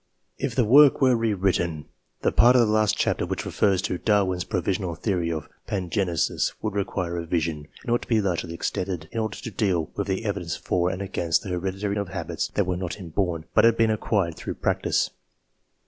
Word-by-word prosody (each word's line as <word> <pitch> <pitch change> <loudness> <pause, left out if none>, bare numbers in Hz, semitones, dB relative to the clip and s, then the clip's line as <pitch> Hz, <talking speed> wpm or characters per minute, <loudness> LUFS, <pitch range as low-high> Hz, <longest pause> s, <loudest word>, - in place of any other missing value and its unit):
If - - -2
the 125 - +3
work 140 +5 +7
were 130 -2 +4
rewritten, 95 -8 0 0.4
the - - +3
part 120 +2 +6
of 120 -2 +6
the 105 - 0
last 110 -1 +2
chapter - - +1
which - - -3
refers 95 -3 +1
to 90 -2 -2
Darwin's 95 -5 +1
provisional 90 -3 -1
theory 90 -3 -1
of 80 -3 -4 0.2
pangenesis 90 -4 0
would 110 -2 -3
require 95 -3 -2
revision, 85 -3 -2 0.2
and 120 - -3
ought 120 - +1
to - - -10
be 115 -2 +3
largely 90 -4 -2
extended, 90 -2 -3
in 115 - -3
order 110 -1 -2
to 115 - -7
deal 90 -6 0
with 100 - -2
the 95 +3 -2
evidence 95 -6 -2
for 90 0 0
and 95 +1 -3
against 85 -3 0
the 100 - -6
hereditary 95 +3 -2
transmission 105 - 0
of 100 - -6
habits - - -2
that - - +2
were 90 0 -1
not 90 0 -4
inborn, 85 -2 -2
but - - +5
had 115 0 +5
been 115 -1 +3
acquired 100 -6 0
through - - -5
practice. - - 0
95 Hz, 200 wpm, -25 LUFS, 85-105 Hz, 0.4 s, work